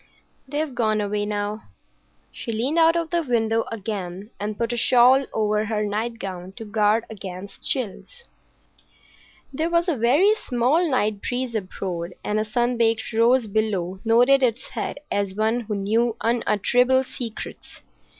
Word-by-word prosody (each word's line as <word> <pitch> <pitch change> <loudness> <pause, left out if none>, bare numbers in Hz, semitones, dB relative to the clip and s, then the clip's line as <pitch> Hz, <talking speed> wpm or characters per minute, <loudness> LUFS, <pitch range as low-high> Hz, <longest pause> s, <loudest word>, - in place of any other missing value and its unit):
"They've 295 0 -2
gone 220 -3 +1
away 205 0 -1
now." 210 +1 -3 0.7
She 230 - -6
leaned 255 +9 0
out 330 0 +5
of 335 -1 -1
the 345 -1 +2
window 230 -5 +1
again, 200 -2 -5
and 205 0 -3
put 235 0 -1
a - - -1
shawl 255 +3 +5
over 215 0 0
her 215 -1 -1
nightgown 205 -4 -4
to 225 - -9
guard 215 +1 +2
against 195 -2 -8
chills. 275 - -3 1.3
There 315 +5 -1
was 340 +1 +2
a 340 - +1
very 275 - +4
small 290 - +1
night 215 -6 0
breeze 250 -1 -2
abroad, 185 -4 -4
and 210 +1 0
a 215 - 0
sun 240 +3 0
baked 225 -1 +1
rose 235 +2 +4
below 195 -4 -1
nodded 245 +4 +5
its 245 -1 0
head - - -4
as 200 -2 -1
one 220 +3 +1
who 220 -3 -4
knew 220 +4 +1
unutterable 245 +3 +2
secrets. 240 -3 -8
225 Hz, 150 wpm, -23 LUFS, 210-250 Hz, 1.3 s, out